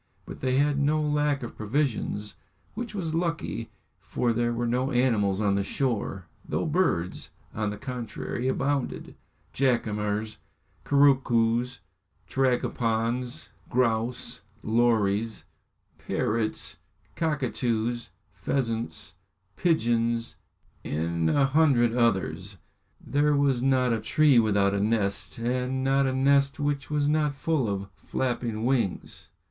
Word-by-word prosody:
But - - -9
they 130 0 +1
had 145 0 +2
no 150 +2 +2
lack 150 -2 +1
of 120 - -7
provisions, 110 -3 -1 0.4
which 230 -1 -5
was 165 -5 -2
lucky, 165 -9 -2 0.3
for 120 -1 -1
there 120 +1 +1
were 120 0 -1
no 125 +3 0
animals 115 -7 +2
on 105 -2 +2
the 100 - +1
shore, 105 -6 -2 0.2
though - - -2
birds, 155 - 0 0.2
on 110 -1 -1
the 105 - -5
contrary, 125 +1 -4
abounded 135 0 -1 0.4
jacamars, 110 -4 0 0.5
couroucoos, 125 -4 +3 0.5
tragopans, 125 0 0 0.2
grouse, 120 0 0 0.2
lories, 110 -1 +1 0.5
parrots, 110 0 -1 0.4
cockatoos, 120 -6 -1 0.2
pheasants, 115 -10 -2 0.4
pigeons, 120 -8 +1 0.5
and 80 +1 -1
a 140 - +3
hundred 135 -5 +3
others. 100 -4 0 0.4
There 145 +1 +1
was 140 -3 +2
not 130 -2 +3
a 115 - 0
tree 140 +3 +4
without 100 -3 +2
a 100 - 0
nest, 105 -2 0
and 125 +3 -1
not 135 0 +3
a 130 - 0
nest 140 +2 +3
which 145 -1 -1
was 150 -1 +1
not 150 -1 +1
full 135 -4 0
of 100 -1 -3
flapping 120 -3 -2
wings. 120 -7 -1
120 Hz, 115 wpm, -27 LUFS, 110-140 Hz, 0.5 s, tree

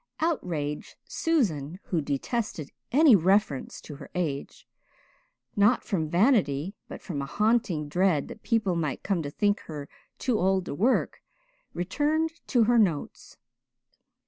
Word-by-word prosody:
Outraged 170 - -2
Susan, 185 - 0
who 170 -4 -1
detested 150 - -3 0.2
any 285 -2 +7
reference 190 -5 +1
to 145 - -10
her - - -11
age 155 -6 -3 0.9
not 210 +5 +4
from 165 -8 -2
vanity 185 - +2
but - - -9
from 150 -7 -4
a 140 - -4
haunting 210 -5 +1
dread 175 -2 +1
that 220 - -10
people 220 -6 +1
might 155 -5 -2
come 195 -4 0
to 145 - -4
think 205 +7 +1
her 145 -2 -6 0.3
too 245 -4 0
old 190 0 +2
to - - -4
work 225 - +1 0.5
returned 300 - 0 0.2
to 240 -3 +3
her 235 +1 +4
"Notes." 170 -9 -1
185 Hz, 135 wpm, -27 LUFS, 150-225 Hz, 0.9 s, any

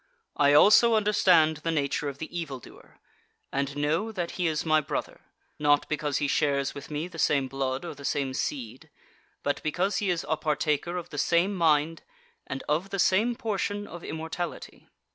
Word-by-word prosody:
I 145 0 +4
also 215 +8 +7
understand 180 -7 +4
the 155 +2 -4
nature 145 -2 0
of 140 - -8
the 160 +3 -8
evil 150 -6 -4
doer, - - -16 0.5
and 140 +1 -2
know 160 +10 0
that 175 -5 -3
he 180 -2 -1
is 155 0 -1
my 155 -1 +4
brother, 140 - -5 0.4
not 145 -1 +3
because 150 -2 -1
he 145 - 0
shares 140 -1 +1
with 140 - -9
me 150 +2 -3
the 170 -2 -10
same 140 -3 +2
blood 135 +2 -3
or 170 - -5
the 140 -1 -13
same 140 -2 -1
seed, 130 -4 -4 0.5
but 145 - -1
because 180 +6 0
he 205 - 0
is 175 -2 -1
a 160 - 0
partaker 155 +3 -1
of 175 - -7
the 145 - -4
same 175 +7 +2
mind 165 -2 +2 0.5
and 130 - -5
of 160 +6 0
the 195 - -3
same 210 +6 +3
portion 205 -2 -2
of 175 -3 -10
immortality. 160 +2 -6
155 Hz, 180 wpm, -27 LUFS, 145-175 Hz, 0.5 s, also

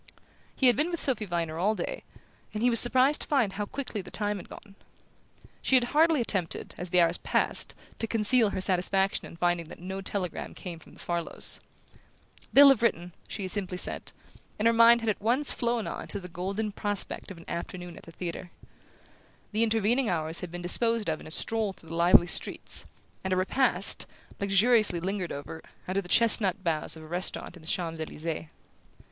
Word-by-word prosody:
He 265 - +1
had 245 -2 +6
been 305 +4 0
with 340 -2 -2
Sophy 240 -6 0
Viner 165 -3 -3
all 210 +5 +2
day, - - -4 0.5
and 215 - -2
he 245 - +4
was 230 - +7
surprised 260 +4 +5
to - - -4
find 250 -9 +1
how 205 +1 -4
quickly 255 -6 -5
the - - -11
time 210 -1 -2
had 185 - -11
gone. 200 - -12 0.9
She 265 - +2
had 255 - +5
hardly 320 0 +4
attempted, 190 -7 -2
as 180 - -5
the 180 - +3
hours 170 0 +3
passed, - - 0 0.2
to 225 - -1
conceal 225 +1 +3
her 190 - -3
satisfaction 190 +1 +1
on - - -12
finding 175 -1 0
that - - -11
no 190 +2 -6
telegram 190 -3 -4
came 175 -4 -8
from - - -17
the - - -18
Farlows. 170 -1 -1 0.9
"They'll 280 +1 +9
have 270 -5 +4
written," 180 -7 0
she 200 - -5
had 185 - -4
simply 190 -3 -3
said; - - 0 0.5
and 215 - -2
her 230 - +4
mind 230 +1 +6
had 225 - -4
at 205 - -7
once 250 +7 +2
flown 235 -2 -1
on - - -6
to 200 - -1
the 180 - -9
golden 195 +5 -3
prospect 205 0 -3
of 190 - -9
an 170 - -14
afternoon 175 0 -6
at - - -12
the 165 - -13
theatre. 175 +1 -6 1.0
The 215 +1 0
intervening 225 +2 +2
hours 160 -2 -1
had 180 - -6
been 175 +1 -7
disposed 230 +2 +3
of 155 - -3
in - - -11
a - - -9
stroll 220 +2 0
through 165 - -16
the 165 - -5
lively 170 +1 +6
streets, 175 - -1 0.4
and 190 - -3
a - - +3
repast, 195 0 +1 0.3
luxuriously 200 -1 +3
lingered 185 0 -3
over, 150 +3 -7 0.3
under 190 +2 0
the 180 - -13
chestnut 210 -4 +3
boughs 165 -2 -1
of 160 - -11
a - - -11
restaurant 175 +1 -4
in 175 - -14
the 160 - -11
Champs 165 -3 -3
Elysees. 160 +1 -5
195 Hz, 200 wpm, -28 LUFS, 175-230 Hz, 1.0 s, They'll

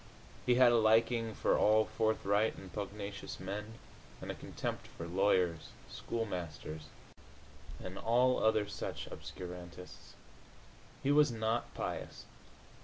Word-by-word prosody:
He 125 - +5
had 125 -1 +7
a 120 - +5
liking 115 0 +3
for - - +2
all 110 +1 +5
forthright 110 -1 +1
and 95 -2 -10
pugnacious 100 0 -5
men, 105 +4 -5 0.4
and - - -5
a - - -4
contempt - - -5
for 85 - -8
lawyers, 90 -2 +2 0.2
schoolmasters 85 -8 -4 0.9
and 95 +1 -6
all 125 +2 +3
other 110 -1 +3
such 105 - -5
obscurantists. 90 0 -9 0.9
He 140 - +3
was 150 -2 +5
not 110 +1 -1
pious. - - -4
105 Hz, 115 wpm, -34 LUFS, 95-115 Hz, 0.9 s, had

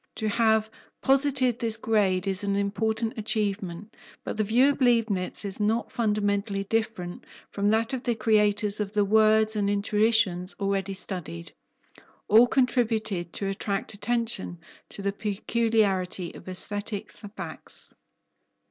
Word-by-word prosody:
To 220 - -2
have 220 0 +2 0.4
posited 265 -3 +3
this 230 -2 +1
grade 205 -5 +1
is 195 +1 -1
an 200 0 0
important 220 +3 -1
achievement, 205 -3 -3 0.3
but - - -4
the 215 - +1
view 240 +6 +4
of 280 - -7
Leibnitz 225 -6 +1
is 195 0 -4
not 220 +3 0
fundamentally 205 -3 0
different 210 -4 -3 0.3
from 200 0 0
that 225 +3 +1
of 260 - -2
the 240 -2 -1
creators 210 -1 +2
of 205 -1 -3
the 205 -1 +2
words 220 +1 +4
and 205 -1 0
intuitions 205 -3 +1
already 195 -1 -1
studied. 175 - -6 0.8
All 225 +4 +7
contributed 225 -9 0
to 195 - -3
attract 195 +1 -3
attention 220 -3 -2 0.3
to 200 - -8
the 200 - 0
peculiarity 205 -4 0
of - - -11
aesthetic 205 +2 0
facts. 205 -1 -9
210 Hz, 130 wpm, -26 LUFS, 195-225 Hz, 0.8 s, All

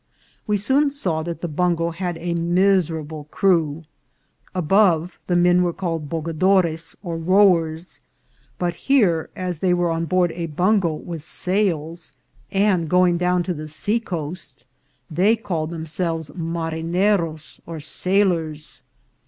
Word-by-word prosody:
We 210 -1 +2
soon 270 +8 +2
saw 185 - -2
that 170 0 -5
the 175 - -2
bungo 170 +1 0
had 175 0 -4
a 170 +1 -3
mis 175 +1 +2
erable 155 -2 -6
crew. 165 -5 +1 0.7
Above 180 -1 +2
the 175 - +1
men 175 +1 +4
were 175 -1 +1
called 165 -5 -3
bogadores 165 +1 0
or 170 -3 -4
rowers; 170 -2 +2 0.6
but 175 -1 -1 0.2
here, 190 - +3
as 180 -3 -4
they 180 0 +2
were 175 -1 +1
on 165 0 -1
board 175 +1 +2
a 170 0 -4
bungo 180 +3 +2
with 165 0 -7
sails, 170 -2 -2 0.4
and 195 -5 +2
going 180 -1 +3
down 180 0 +2
to 180 - -2
the 155 -1 -7
seacoast, 160 - -4 0.5
they 190 +8 +3
called 170 -8 -3
themselves 165 -1 -3
marineros 165 0 -1
or 165 -1 -6
sailors. 165 -3 -1
170 Hz, 130 wpm, -22 LUFS, 160-185 Hz, 0.7 s, men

